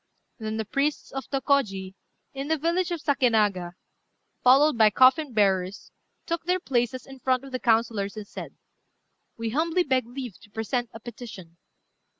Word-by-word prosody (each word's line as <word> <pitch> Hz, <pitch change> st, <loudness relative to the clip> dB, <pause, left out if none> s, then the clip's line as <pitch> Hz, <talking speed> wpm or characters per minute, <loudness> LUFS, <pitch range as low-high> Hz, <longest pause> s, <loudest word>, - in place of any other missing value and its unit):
Then 220 Hz, 0 st, -3 dB
the 220 Hz, -, -2 dB
priests 280 Hz, +7 st, -1 dB
of 270 Hz, 0 st, -6 dB
Tôkôji, 245 Hz, -9 st, 0 dB, 0.4 s
in 275 Hz, +1 st, -5 dB
the 320 Hz, +1 st, +1 dB
village 340 Hz, +4 st, 0 dB
of 340 Hz, -3 st, -3 dB
Sakénaga, 215 Hz, -, +2 dB, 0.7 s
followed 275 Hz, +4 st, +6 dB
by 220 Hz, -2 st, +6 dB
coffin 260 Hz, +6 st, +4 dB
bearers, 195 Hz, -3 st, +1 dB, 0.3 s
took 335 Hz, -1 st, -2 dB
their 365 Hz, +1 st, +1 dB
places 250 Hz, -4 st, -1 dB
in 270 Hz, -1 st, -12 dB
front 255 Hz, 0 st, +1 dB
of 275 Hz, -, -10 dB
the 255 Hz, -, -2 dB
councillors, 225 Hz, -4 st, +1 dB
and 210 Hz, -, -6 dB
said -, -, -8 dB, 0.8 s
"We 230 Hz, -1 st, -3 dB
humbly 330 Hz, +6 st, +1 dB
beg 260 Hz, -6 st, +1 dB
leave 245 Hz, -4 st, -7 dB
to -, -, -17 dB
present 225 Hz, +3 st, -2 dB
a 225 Hz, -, -10 dB
petition." 215 Hz, -8 st, -10 dB
250 Hz, 155 wpm, -26 LUFS, 215-275 Hz, 0.8 s, followed